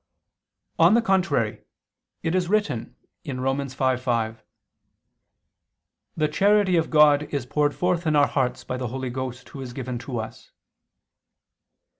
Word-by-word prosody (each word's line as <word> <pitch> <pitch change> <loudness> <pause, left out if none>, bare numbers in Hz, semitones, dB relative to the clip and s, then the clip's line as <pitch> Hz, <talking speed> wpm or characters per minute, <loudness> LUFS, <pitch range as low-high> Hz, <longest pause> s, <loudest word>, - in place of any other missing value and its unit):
On 175 +6 +6
the 235 - +4
contrary, 185 - +1 0.6
It 165 0 0
is 180 -1 0
written 175 - -1 0.3
(Rom. 135 -1 -2
5:5): 125 -4 -1 1.8
"The 155 -1 +2
charity 200 +3 +3
of 165 -1 +1
God 150 -1 +4
is 140 -4 -2
poured 145 +4 0
forth 180 -2 0
in 155 - +2
our 145 -1 +6
hearts 130 -3 -1
by 125 - -4
the 125 -1 -3
Holy 130 +1 -4
Ghost, 130 0 -6
Who 135 - -9
is 125 -2 -7
given 125 -2 -4
to 125 0 -5
us." 110 0 -7
140 Hz, 135 wpm, -24 LUFS, 125-165 Hz, 1.8 s, On